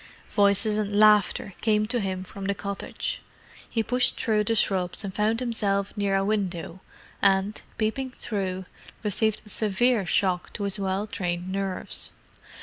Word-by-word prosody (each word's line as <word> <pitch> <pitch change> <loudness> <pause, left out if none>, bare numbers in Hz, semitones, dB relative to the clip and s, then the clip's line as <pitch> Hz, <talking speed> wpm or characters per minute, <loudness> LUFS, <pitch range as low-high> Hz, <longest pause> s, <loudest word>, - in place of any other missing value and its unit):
Voices 205 +1 +3
and 205 -1 -1
laughter 210 -2 +4
came 215 -1 +3
to 240 +3 0
him 190 -3 -2
from 195 +1 -8
the 200 0 0
cottage. 200 - -4 0.5
He 225 - 0
pushed 250 +3 +2
through 215 -3 +2
the 225 - +1
shrubs 185 -2 +1
and 195 -2 -4
found 215 +3 +1
himself 205 -5 0
near 200 -1 +1
a 195 0 +2
window; 190 -4 -2 0.4
and, 195 +1 +2 0.2
peeping 230 +5 -1
through, 190 -6 -3 0.4
received 215 +1 +1
a - - -13
severe 215 0 +1
shock 180 0 +1
to 205 - -4
his 200 0 -2
well 195 +1 0
trained 180 -3 -3
nerves. 195 -1 -3
200 Hz, 150 wpm, -26 LUFS, 190-215 Hz, 0.5 s, laughter